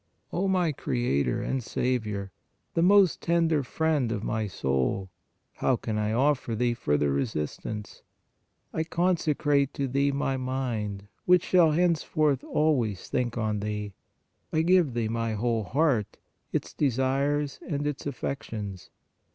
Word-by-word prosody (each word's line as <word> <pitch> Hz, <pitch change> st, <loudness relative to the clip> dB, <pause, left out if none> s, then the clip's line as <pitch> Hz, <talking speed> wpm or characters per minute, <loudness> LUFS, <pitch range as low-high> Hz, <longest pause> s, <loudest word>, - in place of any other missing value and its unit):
" -, -, -33 dB
O 195 Hz, +3 st, 0 dB
my 180 Hz, -4 st, +2 dB
Creator 95 Hz, -, 0 dB
and 130 Hz, -, -1 dB
Saviour, 110 Hz, -6 st, -2 dB, 0.4 s
the 165 Hz, -, +1 dB
most 190 Hz, 0 st, +5 dB
tender 165 Hz, -3 st, +2 dB
friend 145 Hz, -2 st, 0 dB
of 110 Hz, -2 st, -2 dB
my 110 Hz, -1 st, -1 dB
soul, 70 Hz, +3 st, -1 dB, 0.5 s
how 130 Hz, -, +2 dB
can 110 Hz, -2 st, -3 dB
I 105 Hz, 0 st, 0 dB
offer 130 Hz, -1 st, +1 dB
Thee 120 Hz, +1 st, +1 dB
further 75 Hz, -10 st, +1 dB
resist 70 Hz, +2 st, -2 dB
ance? 105 Hz, -2 st, -6 dB, 0.7 s
I 160 Hz, -, 0 dB
consecrate 155 Hz, -5 st, +1 dB
to 140 Hz, -, -1 dB
Thee 140 Hz, +2 st, +1 dB
my 135 Hz, -1 st, -1 dB
mind, 120 Hz, -6 st, -3 dB, 0.2 s
which 180 Hz, -1 st, +5 dB
shall 170 Hz, -4 st, +4 dB
henceforth 155 Hz, -4 st, +2 dB
always 125 Hz, -, 0 dB
think 120 Hz, -2 st, -1 dB
on 110 Hz, -2 st, 0 dB
Thee; 105 Hz, -1 st, -4 dB, 0.6 s
I 155 Hz, -, +2 dB
give 175 Hz, -7 st, +3 dB
Thee 115 Hz, -2 st, 0 dB
my 115 Hz, 0 st, -1 dB
whole 115 Hz, 0 st, 0 dB
heart, 130 Hz, -, +1 dB, 0.3 s
its -, -, -2 dB
desires 140 Hz, +2 st, 0 dB
and 145 Hz, -2 st, -1 dB
its 145 Hz, -1 st, -3 dB
affections. 110 Hz, -8 st, -5 dB
130 Hz, 140 wpm, -27 LUFS, 105-150 Hz, 0.7 s, most